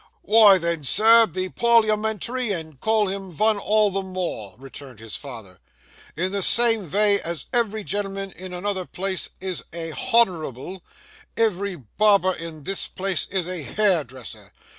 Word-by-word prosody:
'Wy 210 -2 +6
then, 170 -3 -2
sir, 225 - +6
be 185 -2 -3
parliamentary 220 +2 +1
and 160 -6 -5
call 220 +3 +1
him 195 0 -5
vun 215 +5 +1
all 210 0 +2
the 195 +1 -2
more,' 180 - -5
returned 135 -1 -11
his 110 0 -7
father. 110 -10 -9 0.6
'In 185 +3 -1
the 200 0 -2
same 225 -1 +4
vay 205 +3 +2
as 170 -3 -5
ev'ry 220 -3 0
gen'lman 195 -1 -4
in 185 +1 -10
another 185 +1 -3
place 190 0 -3
is 185 -2 -4
a 165 -1 -5
_h_onourable, 185 - 0 0.6
ev'ry 200 -3 0
barber 185 - +2
in 165 -3 -8
this 195 +6 -1
place 190 -1 -2
is 185 -3 -2
a 180 -2 -4
hairdresser. 130 - -2
190 Hz, 145 wpm, -23 LUFS, 165-210 Hz, 0.6 s, Wy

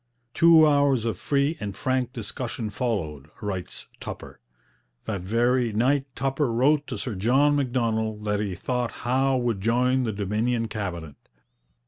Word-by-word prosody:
'Two 165 -1 +7
hours 140 -5 +3
of 115 -4 -1
free 140 - 0
and 100 -2 -5
frank 130 -1 0
discussion 115 -1 -5
followed,' 85 - -3
writes 95 -3 -5
Tupper. - - -8 0.7
That 100 -4 -3
very 120 +4 +1
night 135 +5 +2
Tupper 135 0 0
wrote 140 +5 +2
to - - -4
Sir 125 - -4
John 130 +9 +3
Macdonald 115 -5 -1
that 105 -1 0
he 100 -3 -2
thought 125 +6 -2 0.2
Howe 130 +2 +2
would 120 -5 -1
join 125 +4 +2
the 115 - -1
Dominion 110 +4 -1
Cabinet. 85 -9 -5
120 Hz, 140 wpm, -25 LUFS, 105-130 Hz, 0.7 s, Two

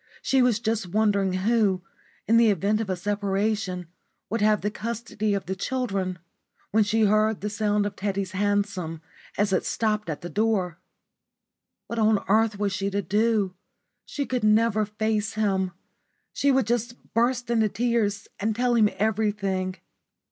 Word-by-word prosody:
She 265 -1 +3
was 245 -3 +3
just 220 -3 -1
wondering 200 0 +2
who, 195 -1 +1 0.4
in 230 +2 +5
the 230 -1 +6
event 205 +3 +1
of 215 - -4
a 185 - 0
separation, 200 -1 -1 0.5
would 230 -1 0
have 210 -1 +3
the 205 - -1
custody 215 -2 -2
of 195 - -3
the 190 - -3
children, 195 -5 -2 0.5
when 220 +1 +4
she 220 +1 +2
heard 215 +1 +2
the 210 +1 -3
sound 210 -1 +1
of 205 - -4
Teddy's 195 -1 -2
hansom 195 -5 -1 0.3
as 200 -1 +1
it 185 - +2
stopped 210 -3 -1
at 150 - -4
the 175 - -5
door. 200 -6 0 1.1
What 235 - -4
on 215 -1 +4
earth 215 +1 +3
was 200 -1 -1
she 195 +1 -1
to 200 0 -2
do? 210 +1 +1 0.5
She 285 - -4
could 250 -4 -2
never 215 0 +3
face 215 +1 -1
him. 195 -3 +1 0.6
She 280 - +2
would 265 -3 +3
just 240 +1 -1 0.2
burst 240 +1 +1
into 220 -2 +3
tears 220 -2 0
and 215 +2 0
tell 245 +1 +1
him 220 -3 +4
everything. 200 -3 0
210 Hz, 160 wpm, -25 LUFS, 195-225 Hz, 1.1 s, the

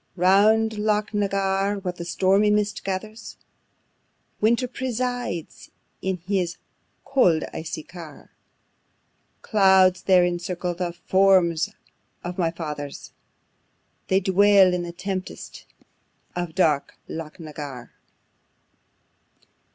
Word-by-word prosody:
Round 210 +4 +3
Loch 210 0 0
na 205 -1 +1
Garr, 195 +1 0
while 185 -2 -4
the 170 -1 -8
stormy 190 +4 +2
mist 210 0 0
gathers, 215 +3 -5 1.0
Winter 235 +4 +2
presides 245 -8 -4 0.3
in 190 -1 -1
his 180 -3 -1 0.5
cold 180 -13 +3
icy 160 -1 -5
car: 165 -4 -12 1.1
Clouds, 190 -3 +4
there, 185 -2 +4
encircle 175 0 -2
the 175 0 -3
forms 185 -4 +3 0.5
of 180 +1 -5
my 170 -2 +2
Fathers; 150 -4 -7 1.0
They 190 - +3
dwell 195 0 +5
in 180 - -1
the 175 0 -5
tempests 185 +1 -6 0.7
of 175 -2 -4
dark 155 -6 +1
Loch 160 +1 -7
na 155 -2 -8
Garr. 140 -5 -8
185 Hz, 105 wpm, -24 LUFS, 175-205 Hz, 1.1 s, dwell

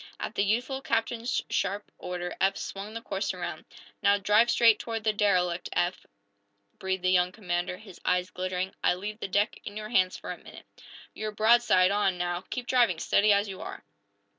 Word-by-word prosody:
At - - -4
the 200 - +1
youthful 245 +6 0
captain's 230 0 -1
sharp 205 +1 -1
order 180 -1 -4
Eph 195 +1 +3
swung 205 +3 -6
the 230 - -6
course 195 +1 -2
around. - - -6 0.4
"Now, 200 -1 +4
drive 210 +4 +4
straight 230 -3 +5
toward 225 -1 -4
the 215 0 +2
derelict, 180 -4 +1
Eph!" 175 +1 -1 0.7
breathed 190 -1 -2
the 185 - +3
young 180 -1 +3
commander, 180 -2 -3
his 195 -4 -14
eyes 180 0 +1
glittering. 185 +1 -3
"I - - +4
leave 210 +4 -6
the - - -3
deck 205 +3 0
in 205 - -7
your 215 0 -6
hands 185 -5 +2
for - - -7
a - - -7
minute. - - -13 0.5
You're 215 0 -4
broadside 215 -4 +4
on, 200 -3 +1
now. 175 0 -2
Keep 250 -1 -4
driving, 240 -9 +3
steady, 210 +6 +3
as 200 +1 +3
you 190 -1 -7
are!" - - -7
200 Hz, 190 wpm, -28 LUFS, 185-220 Hz, 0.7 s, straight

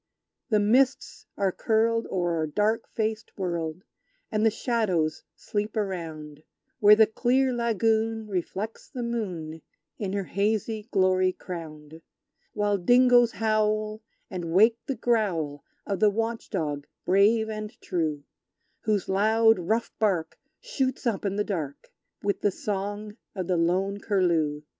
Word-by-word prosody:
The 215 -2 +3
mists 255 +6 +1
are 195 -1 +1
curled 230 +3 +1
o'er 175 -3 0
a 155 - -1
dark 215 +7 0
faced 220 -1 -3
world, 170 -2 -3 0.5
And 215 0 +1
the 225 - +6
shadows 195 -10 0
sleep 210 +1 -3
around, 160 -7 -4 0.4
Where 210 -2 +8
the 220 0 +6
clear 255 +4 +1
lagoon 225 -1 +1
reflects 200 +3 -4
the 250 -4 -5
moon 180 -9 -4 0.4
In 195 -3 -3
her 200 -1 -1
hazy 210 +3 -1
glory 185 -2 +3
crowned; 160 -3 -9 0.5
While 205 -1 +1
dingoes 245 +4 +5
howl, 215 0 0 0.3
and 180 -3 -5
wake 220 +6 +5
the 270 - -1
growl 185 - 0 0.2
Of 200 -2 -2
the 215 - +5
watchdog 195 -9 -3 0.2
brave 210 +4 +4
and 215 +1 -6
true; 155 -5 -2 0.6
Whose 210 -3 +1
loud, 220 +2 +4
rough 220 +7 -1
bark 190 -7 0 0.2
shoots 265 - -2
up 220 -4 -1
in 200 -1 -1
the 210 - +1
dark, 155 -9 -5 0.3
With 200 0 -1
the 205 - +3
song 205 +2 -4 0.2
of 185 -2 -3
the 180 +1 0
lone 190 +4 +1
Curlew! 170 -8 +1
205 Hz, 135 wpm, -26 LUFS, 180-225 Hz, 0.6 s, Where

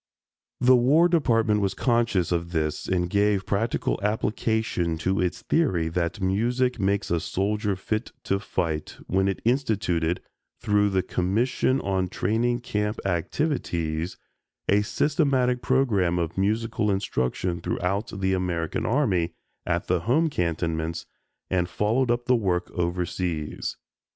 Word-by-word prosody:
The 130 +1 +6
War 140 +8 +5
Department 115 -11 +2
was 100 -1 0
conscious 115 - +1
of 85 0 -1
this 75 -2 -1
and 90 -1 +1
gave 100 +1 +2
practical 110 +3 0
application 105 -4 0
to 95 +4 0
its 90 -1 -2
theory 95 - +1
that 85 +3 -2
music 120 +7 +1
makes 100 0 0
a 85 - +2
soldier 100 +4 -1
"fit 110 +4 -3
to 100 - 0
fight" 80 -6 -3
when 95 +1 +1
it 95 - -2
instituted, 100 - +1 0.4
through 105 -1 +2
the 95 -2 +1
Commission 120 +8 +1
on 95 -1 0
Training 120 +6 0
Camp 105 -2 -2
Activities, 85 - -1 0.5
a 100 +1 +4
systematic 130 0 +1
program 105 -11 +2
of 85 -1 -2
musical 105 +2 0
instruction 90 -2 -1
throughout 100 +5 -1
the 95 0 +2
American 90 -3 -1
Army 105 - +1 0.3
at 85 0 0
the 90 0 +1
home 145 - +2
cantonments 80 - -2 0.5
and 90 -1 +1
followed 115 +5 +1
up 120 0 +1
the 125 - +4
work 90 -6 0
overseas. 85 -2 -2
100 Hz, 130 wpm, -25 LUFS, 90-115 Hz, 0.5 s, The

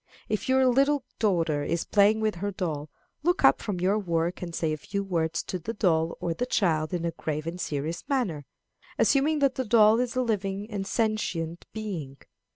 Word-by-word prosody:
If 215 +4 -2
your 260 0 +4
little 275 +2 +3 0.2
daughter 165 -8 +1
is 170 +2 -1
playing 210 +1 +4
with 215 -1 +1
her 205 - 0
doll, 160 -6 -3 0.3
look 350 +4 +1
up - - +5
from 200 -5 -3
your 195 +4 +2
work 170 -2 -1
and 170 -2 -5
say 160 -2 0
a - - -3
few 200 +6 -4
words 170 -3 -1
to 185 - -4
the 225 +8 -5
doll 165 -5 +1
or 170 - -1
the 250 +9 -3
child 160 -9 +1
in 175 -2 -2
a 170 - 0
grave 155 -1 -4
and 175 +2 -4
serious 155 +3 -3
manner, 185 - -1 0.5
assuming 295 +3 +3
that 270 - +2
the 260 - -2
doll 220 -1 +5
is 250 0 -1
a 255 - +2
living 205 -2 -2
and 195 -2 -3
sentient 180 -7 -1
being. 175 -11 -5
195 Hz, 195 wpm, -27 LUFS, 165-220 Hz, 0.5 s, up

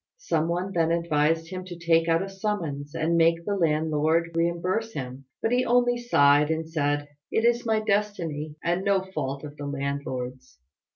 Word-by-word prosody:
Some 165 - 0
one 180 +3 -2
then 165 -1 +2
advised 165 0 +1
him 185 0 -5
to 175 -2 -8
take 165 -1 +2
out 165 +2 +2
a - - -5
summons 175 -8 -4
and 165 +1 +1
make 165 0 +3
the 205 - 0
landlord 160 -1 +1
reimburse 175 +7 -1
him; 130 -2 -6 0.2
but 225 - +1
he 250 +1 +3
only 245 0 +3
sighed, 150 -11 +4
and 160 0 -1
said, 145 -2 -1 0.2
"It 225 - +1
is 240 0 +2
my 220 -1 +2
destiny, 180 -8 -1
and 175 +2 0
no 195 -1 +2
fault 140 -7 -4
of 145 -1 -8
the 145 - -5
landlord's." 135 - -4
165 Hz, 175 wpm, -26 LUFS, 150-190 Hz, 0.2 s, sighed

